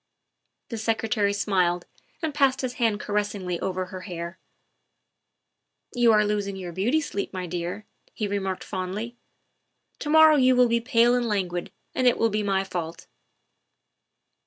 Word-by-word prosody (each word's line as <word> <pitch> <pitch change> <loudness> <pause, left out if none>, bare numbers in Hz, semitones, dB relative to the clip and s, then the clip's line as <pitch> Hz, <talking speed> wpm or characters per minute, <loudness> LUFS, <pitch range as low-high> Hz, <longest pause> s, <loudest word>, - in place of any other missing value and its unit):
The 230 - -4
Secretary 220 -2 0
smiled 180 -4 +1 0.4
and 315 -2 -1
passed 275 -2 +2
his 255 -2 -3
hand 220 -3 +2
caressingly 205 -4 -2
over 185 -1 -2
her 185 0 -8
dark 185 - -10
hair. 170 0 -6 0.8
" - - -40
You 240 -2 +4
are 210 -1 +4
losing 205 -1 -1
your 185 -2 -6
beauty 215 - +1
sleep, 200 -10 -4
my 185 -1 -4
dear," 180 +4 -4 0.3
he 210 - -2
remarked 195 -2 -2
fondly; 200 +5 -4 0.4
" - - -47
to 295 - -4
morrow 315 0 +7
you 255 -1 +5
will 250 0 +5
be 235 0 +1
pale 240 -1 +4
and 245 -1 +1
languid, 180 -5 -2 0.2
and 255 - +2
it 245 - +4
will 230 -1 +2
be 210 +1 0
my 195 -2 +1
fault." 170 -3 -5
205 Hz, 160 wpm, -25 LUFS, 185-235 Hz, 0.8 s, morrow